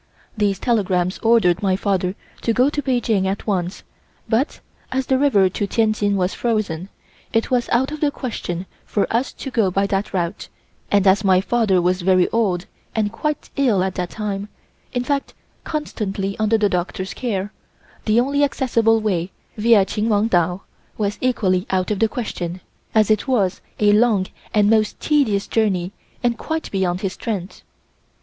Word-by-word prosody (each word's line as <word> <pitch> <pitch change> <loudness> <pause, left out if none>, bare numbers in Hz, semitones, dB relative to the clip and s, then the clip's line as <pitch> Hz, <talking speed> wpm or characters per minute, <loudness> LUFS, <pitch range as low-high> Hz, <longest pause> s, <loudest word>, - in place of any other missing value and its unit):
These 205 -3 +1
telegrams 185 -5 0
ordered 215 -6 +3
my 190 -2 +2
father 190 -1 0 0.3
to 230 - +1
go 255 +5 +3
to 295 - -2
Peking 240 -7 +1
at 195 +1 -3
once, 185 -3 -2 0.4
but, 230 +6 0 0.3
as 265 0 0
the 260 0 +2
river 235 -10 +4
to 200 +2 -2
Tientsin 215 -2 +1
was 185 -1 0
frozen, 200 -7 -1 0.4
it 225 +2 0
was 245 -2 +1
out 260 +4 +2
of 305 - -5
the 295 - +2
question 190 -10 -4 0.2
for 205 - 0
us 245 +3 0
to 270 - -7
go 220 -6 +2
by 195 +2 +1
that 195 0 -1
route, 180 +1 -3 0.4
and 205 -1 +3
as 195 +2 +4
my 190 -2 +5
father 205 -2 +2
was 180 +1 +1
very 185 0 +4
old 195 -6 0 0.3
and 210 -2 +1
quite 300 +6 -3
ill 235 -9 +3
at 190 -1 -1
that 180 -2 -3
time, 205 -1 -4 0.4
in 245 -1 -1
fact 280 +2 -2 0.3
constantly 200 -10 -3
under 215 +1 +3
the 210 -1 +3
doctor's 185 +1 -2
care, 205 -5 -3 0.5
the 215 +2 +4
only 280 +3 +2
accessible 230 -5 +2
way, 185 -5 -1 0.3
via 215 -2 +5
Chinwangtao, 205 -4 +1 0.4
was 205 -1 -1
equally 195 -7 +1
out 185 +1 0
of 205 - -1
the 225 - +3
question, 185 -7 -4 0.4
as 215 -1 +4
it 215 +3 +1
was 205 -9 +1 0.2
a 210 -1 +5
long 210 -3 +3 0.3
and 210 -1 +3
most 215 -1 +2
tedious 245 -10 +2
journey 190 -5 0 0.3
and 235 -1 +1
quite 320 0 -3
beyond 185 -2 0
his 195 -2 -2
strength. 200 -4 -5
210 Hz, 165 wpm, -21 LUFS, 190-230 Hz, 0.5 s, my